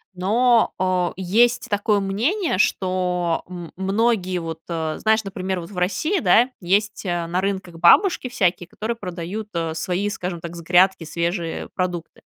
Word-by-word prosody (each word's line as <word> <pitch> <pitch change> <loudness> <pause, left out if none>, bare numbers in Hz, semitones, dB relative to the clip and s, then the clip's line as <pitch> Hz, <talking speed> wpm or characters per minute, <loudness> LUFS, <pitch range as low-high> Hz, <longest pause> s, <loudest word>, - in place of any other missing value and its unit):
но, 225 +6 +3
а, 185 -1 +1
есть 235 +7 +2
такое 205 0 +1
мнение, 235 - 0
что, 180 -3 0
м, 175 -2 -8
многие 195 -1 0
вот, 165 -1 -6
а, 160 -2 -2
знаешь, 220 0 +2
например 190 -1 -3
вот, 170 - -8
в 200 - -11
России, 305 - 0
да, 230 +6 +5
есть, 205 +4 0
а, 175 -2 -1
на 175 +2 -1
рынках 190 -3 -3
бабушки 340 - +5
всякие, 180 -5 0
которые 220 +6 -4
продают, 185 +2 -6
а, 165 -2 -2
свои, 185 +5 -1
скажем 180 -4 -4
так, 170 0 -7
с 170 - -7
грядки 180 +2 +3
свежие 170 +1 -3
продукты. 180 -2 -3
185 Hz, 155 wpm, -22 LUFS, 175-210 Hz, -, да